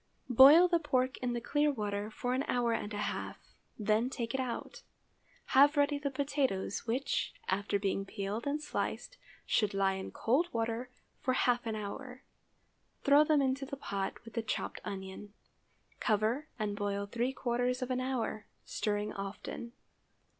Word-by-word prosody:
Boil 285 +9 +9
the 345 -1 +2
pork 260 -3 0
in 250 -1 -1
the 240 - -1
clear 295 +5 +2
water 205 -4 -3
for 245 +3 -2
an 260 - +1
hour 240 -2 +1
and 215 -2 -3
a 205 - -4
half, - - -4 0.4
then 215 +3 +2
take 235 -2 -4
it 265 - -1
out. 260 - -4 0.7
Have 285 +3 +6
ready 285 0 +3
the 285 -1 -1
potatoes, 265 -8 -1
which, 255 +5 -1
after 200 +2 0
being 195 0 -1
peeled 205 +5 -4
and 290 +2 0
sliced, - - -3 0.3
should 210 -3 +1
lie 195 -1 +3
in 190 0 -5
cold 285 +10 +1
water 230 +2 -2 0.3
for 255 - 0
half 245 -2 +2
an 220 - -1
hour. 250 +5 -6 0.8
Throw 285 +2 +7
them 300 -2 +3
into 265 +1 0
the 275 +1 -6
pot, 200 -3 -4
with 230 - -11
the 230 - -1
chopped 220 - -3
onion. 195 +1 -7 0.7
Cover 220 +8 +1
and 210 -3 -2
boil 200 -1 -2
three 235 +5 -1
quarters 250 0 -1
of 255 - -4
an 255 0 0
hour, 250 -4 -2 0.2
stirring 210 0 -2
often. 200 +4 -6
240 Hz, 160 wpm, -32 LUFS, 210-270 Hz, 0.8 s, Boil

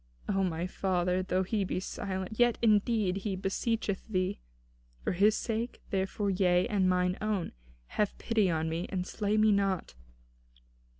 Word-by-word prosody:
O 195 -1 +1
my 170 -2 -1
father, 180 -1 0
though 185 0 0
he 205 +2 0
be 180 - -2
silent, 190 +2 -5
yet, 240 -1 +4
indeed, 210 -3 +2
he 195 0 -2
beseecheth 200 +1 -1
thee. 185 -2 -1 0.6
For - - 0
his 205 +4 +4
sake, 230 +1 -3
therefore, 195 +1 0
yea, 180 -1 +3
and 205 -5 +1
for - - +4
mine 180 0 +1
own, 215 -4 -1 0.3
have 210 - -1
pity 220 -5 +1
upon 160 -1 0
me, 165 +2 -2
and 180 -2 -2
slay 210 +2 -1
me 215 0 +5
not." 195 -2 0
195 Hz, 160 wpm, -30 LUFS, 185-210 Hz, 0.6 s, me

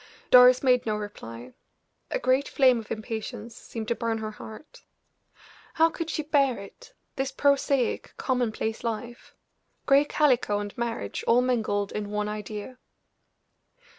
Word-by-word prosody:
Doris 250 +1 +8
made 250 -3 +3
no 215 - +1
reply; 125 - -8 0.6
a - - -1
great 270 - +1
flame 255 -3 +4
of 220 - -10
impatience 220 +1 -5
seemed 225 -3 -7
to - - +3
burn 230 -1 -2
her 215 -1 -5
heart. 220 - -12 0.9
How 325 0 +4
could 330 -1 -5
she 310 - -2
bear 280 -4 +2
it, 200 - -13 0.2
this 270 0 -1
prosaic, 280 -3 +1
commonplace 230 -4 -2
life? 235 +1 -5 0.5
Gray 280 +1 +5
calico 255 -9 +2
and 205 0 -5
marriage 235 -1 -4
all 240 +2 +5
mingled 215 -5 0
in 210 -1 -4
one 210 0 -2
idea! 210 +4 -6
235 Hz, 135 wpm, -26 LUFS, 215-265 Hz, 0.9 s, Doris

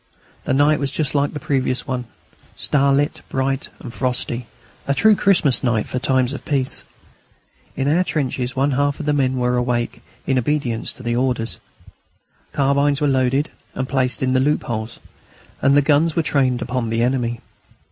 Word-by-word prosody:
The - - 0
night 150 +2 +4
was 140 -1 -1
just 150 -1 -1
like 145 0 +1
the 150 - -4
previous 135 -4 -1
one, 125 -1 -3 0.5
starlit, 140 0 +1
bright, 135 0 -1
and 120 - -8
frosty, 125 -2 -2 0.4
a 140 - +1
true 215 +8 +5
Christmas 175 -10 +3
night 115 -4 +1
for 125 - -3
times 130 0 +1
of - - -7
peace. 135 -3 -1 0.9
In 135 0 -1
our 165 +5 +3
trenches 130 -6 -2
one 135 +2 +2
half 145 +1 0
of 155 - -4
the 150 - +2
men 130 -2 +1
were 125 0 +1
awake, 120 -1 -1 0.2
in 130 -1 +2
obedience 125 -3 -1
to 120 -2 -3
orders. 125 -2 -1 0.9
Carbines 140 +1 +2
were 150 - +1
loaded 135 +2 +1 0.2
and 130 - -2
placed 130 -2 0
in 130 0 +1
the 130 - +3
loopholes, 120 -5 -1 0.6
and 140 +1 +4
the 145 - +5
guns 150 +3 +3
were 165 - +2
trained 130 -5 +1
upon 125 -1 -2
the 115 +1 +1
enemy. 120 -2 0
135 Hz, 165 wpm, -20 LUFS, 125-145 Hz, 0.9 s, true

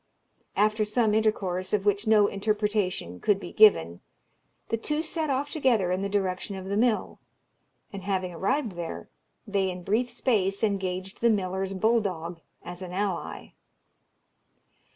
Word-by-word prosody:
After 215 +1 +2
some 215 0 +1
intercourse, 200 -4 0
of 205 -1 +1
which 205 +2 +1
no 215 -1 +6
interpretation 205 - -1
could 200 - +2
be 175 - -8
given, 85 - +5 0.7
the - - +1
two 300 +7 -2
set 315 -1 -2
off 280 +2 -1
together 235 - +2
in 185 +1 0
the 200 - -2
direction 195 0 -1
of 190 -1 -7
the 200 +1 -2
mill; 225 0 +1 0.7
and 200 - -6
having 185 -2 -2
arrived 230 - 0
there, 170 -2 -6 0.4
they 200 -3 0
in 180 -1 -6
brief 230 +7 +1
space 210 -5 0
engaged 190 -2 -2
the 235 - +5
miller's 190 -2 -1
bull 225 +4 +3
dog 170 -4 -4 0.2
as 175 +1 -8
an 180 -1 -7
ally. 190 -2 -3
200 Hz, 150 wpm, -27 LUFS, 185-220 Hz, 0.7 s, no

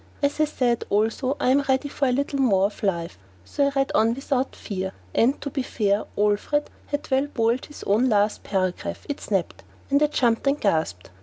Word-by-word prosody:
As 285 +1 +1
I 310 - +5
said, 250 -5 0
also, 225 +7 +1
I - - +2
am 280 +2 +4
ready 265 +2 +2
for 275 -1 -1
a - - +2
little 280 +2 -1
more 200 -8 +4
of 205 - -4
life, 170 - -2 0.3
so 280 - +1
I - - 0
read 270 0 +1
on 225 +1 +3
without 270 -1 -1
fear. 190 -1 -4 0.2
And, 250 +5 +3
to 280 - -4
be 270 - -1
fair, 205 -4 0
Alfred 210 +8 +1 0.2
had 290 -1 -4
well 265 +2 +2
boiled 235 -2 0
his 295 - -11
own 225 +6 +2
last 210 -1 +2
paragraph. 185 -2 -2
It 285 - -4
snapped; 195 -5 -2 0.3
and 280 +1 +4
I 300 - +5
jumped 240 -3 +1
and 280 +2 +2
gasped. 155 - -1
245 Hz, 205 wpm, -24 LUFS, 205-280 Hz, 0.3 s, I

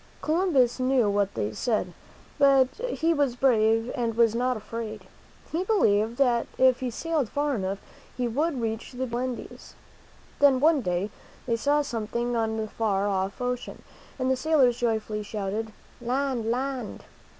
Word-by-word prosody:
Columbus 310 -8 +2
knew 255 -4 +2
what 200 -1 0
they 105 +1 -1
said, 215 -6 -1 0.5
but 275 -2 +5 0.2
he 335 -7 +1
was 285 -5 +1
brave 225 -2 +2
and 230 -2 -2
was 230 -2 +4
not 250 +1 0
afraid. 215 -2 -6 0.5
He 335 +3 0
believed 230 - +2
that 245 -4 +2
if 260 -1 +4
he 255 - -2
sailed 300 0 -1
far 290 +3 0
enough 195 -4 -2 0.4
he 250 -1 0
would 285 +4 -1
reach 225 +1 -4
the 255 +1 -2
beautiful 240 -1 -3
Indies. 255 -1 -6 0.6
Then, 280 -2 +5
one 305 0 +4
day, 180 0 -1 0.3
they 235 - +1
saw 290 +5 +2
something 235 -1 -2
on 225 -1 0
the 220 0 -2
far 205 -2 0
off 195 +1 -1
ocean, 250 0 -4 0.3
and 260 -1 0
the - - +3
sailors 260 -4 +3
joyfully 220 -2 -1
shouted, 210 +1 -4 0.3
Land! 250 -2 -1
Land! 255 -1 -3
240 Hz, 155 wpm, -26 LUFS, 220-270 Hz, 0.6 s, but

